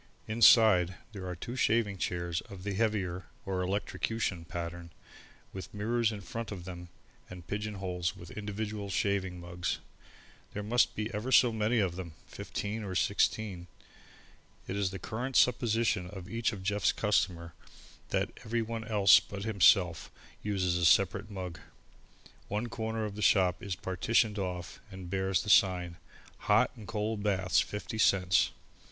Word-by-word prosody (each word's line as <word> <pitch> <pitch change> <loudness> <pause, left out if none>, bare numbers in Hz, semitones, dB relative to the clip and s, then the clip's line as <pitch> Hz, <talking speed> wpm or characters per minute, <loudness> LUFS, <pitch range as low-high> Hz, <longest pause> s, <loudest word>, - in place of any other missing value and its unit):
Inside, 110 -5 +6 0.2
there 95 -4 -7
are 90 - -4
two 120 +8 -6
shaving 110 -5 +1
chairs 85 -1 -2
of 95 -2 -10
the 100 0 -2
heavier, 95 -4 -1 0.2
or 95 -1 -1
electrocution 95 -1 -2
pattern, 85 0 -6 0.6
with 95 +2 -8
mirrors 115 +2 +1
in 105 -2 -6
front 115 +5 -6
of 90 -4 -7
them 90 -1 -8 0.4
and 90 -2 -10
pigeon 105 +3 -4
holes 90 -1 -3
with 85 -2 -11
individual 105 0 -4
shaving 95 -2 -1
mugs. 90 +1 -3 0.8
There 105 - -4
must 120 +4 +2
be 110 +1 -3
ever 105 +5 -3
so 125 -3 +6
many 110 +2 +1
of 95 -5 0
them, 85 -4 -6
fifteen 105 +2 -5
or 95 -2 -5
sixteen. 100 -2 0 1.0
It 95 - -3
is 100 -2 0
the 95 - -6
current 120 +7 -5
supposition 115 -6 +2
of 95 -2 -9
each 115 +2 -1
of 100 -4 -7
Jeff's 100 0 +2
customers 90 -5 0 0.6
that - - 0
everyone 115 0 -2
else 100 -3 +6
but 100 +2 -8
himself 95 -5 +4 0.3
uses 95 -4 0
a 85 - +2
separate 100 +4 +3
mug. 90 -4 -6 0.9
One 105 +4 -2
corner 110 -1 -3
of 105 - -5
the 105 - -7
shop 90 -4 +3
is 100 -3 -3
partitioned 105 +4 +1
off 90 -3 -4
and 95 -2 -9
bears 95 -1 0
the 105 - 0
sign: 90 -4 +3 0.4
HOT - - +3
AND 110 - -11
COLD 110 -1 -2
BATHS, 95 -3 +2
50 110 +2 -3
CENTS. 90 -3 +4
100 Hz, 150 wpm, -31 LUFS, 90-110 Hz, 1.0 s, Inside